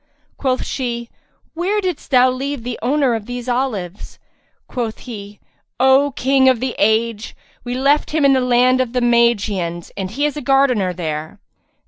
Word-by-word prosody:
Quoth 260 -2 -1
she, 235 -3 -4 0.4
"Where 370 +6 0
didst 365 -6 -4
thou 255 -2 +5
leave 270 0 -4
the 245 0 -5
owner 270 +1 +2
of 220 -2 -4
these 245 0 -6
olives?" 225 -8 -3 0.5
Quoth 235 -4 -4
he, 205 -4 -9 0.4
"O 265 +2 +5
King 265 0 +3
of 255 -3 +2
the 255 0 -2
age, 220 +1 +1 0.3
we 245 0 -4
left 280 +3 +2
him 305 -2 +1
in 275 - +6
the 260 - +2
land 250 +1 +3
of 250 -2 -3
the 250 - +1
Magians 210 -8 +1
and 190 -2 -4
he 275 +8 -1
is 295 - -1
a 300 - -5
gardener 255 -8 +2
there." 160 +1 -5
245 Hz, 165 wpm, -19 LUFS, 220-270 Hz, 0.5 s, in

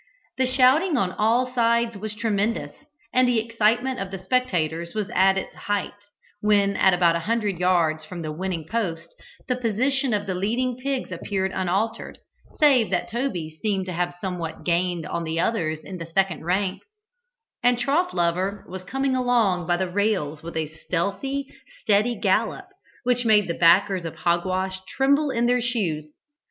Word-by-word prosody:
The 260 - +3
shouting 270 +6 +4
on 190 -6 +1
all 240 +5 +1
sides 235 -1 +2
was 210 +1 -5
tremendous, 215 0 -1 0.4
and 255 0 +4
the 245 -1 +2
excitement 230 +3 +1
of 195 -1 -4
the 195 - -5
spectators 175 -6 -1
was 210 0 -2
at 190 -1 +4
its 190 - -4
height, 205 -2 -2 0.5
when 205 -1 +3
at 190 -2 +4
about 170 -2 +3
a - - 0
hundred 210 -6 0
yards 170 -4 +2
from 170 +2 -7
the 155 - -4
winning 170 0 -4
post 170 -7 -3 0.3
the 250 - +1
position 255 +3 0
of 205 -2 0
the 190 - -2
leading 235 +7 -1
pigs 265 0 -3
appeared 190 -2 -2
unaltered, 195 +5 -2 0.4
save 270 -7 +4
that 180 - -1
Toby 210 - -2
seemed 200 -3 0
to 185 - -5
have 175 +1 -2
somewhat 175 -4 -5
gained 175 -1 0
on 170 - -3
the 160 0 -2
others 160 -6 0
in 185 -2 -8
the 165 - -6
second 175 -2 0
rank, 185 +2 0 0.8
and 245 0 +3
Trough 290 +9 +1
lover 185 +3 -1
was 185 0 -7
coming 270 +6 -1
along 230 -9 +2
by 175 - +2
the 190 +1 -1
rails 180 -6 -1
with 165 0 -7
a 160 -1 -1
stealthy, 200 - -3 0.3
steady 215 - +2
gallop, 225 - +1 0.4
which 245 0 +1
made 215 -3 +4
the 170 - -1
backers 180 +2 +4
of 165 - -5
Hogwash 185 +2 -1
tremble 280 +5 +2
in 240 -2 0
their 245 +1 +2
shoes. 190 -11 -1
200 Hz, 170 wpm, -24 LUFS, 175-240 Hz, 0.8 s, shouting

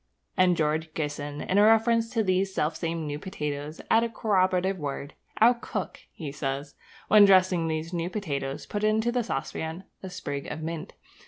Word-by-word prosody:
And 185 -2 +4
George 155 +1 0
Gissing 145 -1 -3
in 195 - +3
a - - +7
reference 225 +1 +4
to 225 -1 0
these 190 0 +1
selfsame 165 +1 -1
new 145 0 -4
potatoes, 150 -4 -5
adds 225 +1 +5
a 235 - -1
corroborative 190 -4 +1
word. 140 -1 -5 0.3
'Our 235 +3 +7
cook,' 235 - -5
he 150 -4 -6
says, 140 0 -4 0.3
'when 210 -1 +8
dressing 185 -3 +4
these 160 +2 -3
new 170 0 -1
potatoes, 140 -9 -3
puts 205 0 -4
into 220 +2 +2
the 245 0 0
saucepan 160 +2 -4 0.2
a 190 - -6
sprig 145 -6 -5
of 155 +1 -5
mint. 165 -1 -5
170 Hz, 170 wpm, -27 LUFS, 150-205 Hz, 0.3 s, when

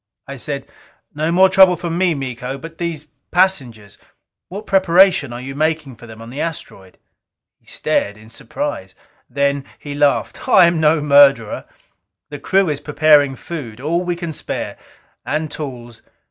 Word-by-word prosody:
I - - -7
said, - - -5 0.5
"No 155 +2 -1
more 185 +2 +5
trouble 190 -1 +6
from 170 -1 -4
me, 180 -2 +1
Miko. 130 -1 -5
But 165 +4 -11
these 165 -3 -4 0.2
passengers 130 - -1 0.5
what 200 +4 -7
preparation 185 - +3
are 120 - -6
you 135 +2 -7
making 155 -2 -2
for 120 +1 -14
them 110 0 -11
on 115 - -11
the 140 - -5
asteroid?" 100 - -7 0.6
He - - -36
stared 100 +1 -1
in 110 +1 -16
surprise. 115 -6 -6 0.3
Then 140 0 0
he 145 - -8
laughed. 145 -1 0
"I 180 - +7
am 170 -1 +1
no 155 0 +3
murderer. 140 -6 +4 0.7
The 145 - -7
crew 195 +4 +2
is 145 -2 -2
preparing 145 -2 +3
food, 130 -8 -8
all 165 +6 -1
we 175 -1 -2
can 170 -2 -6
spare. - - -5 0.5
And 155 0 -3
tools. 120 -6 -8
145 Hz, 160 wpm, -18 LUFS, 130-170 Hz, 0.7 s, I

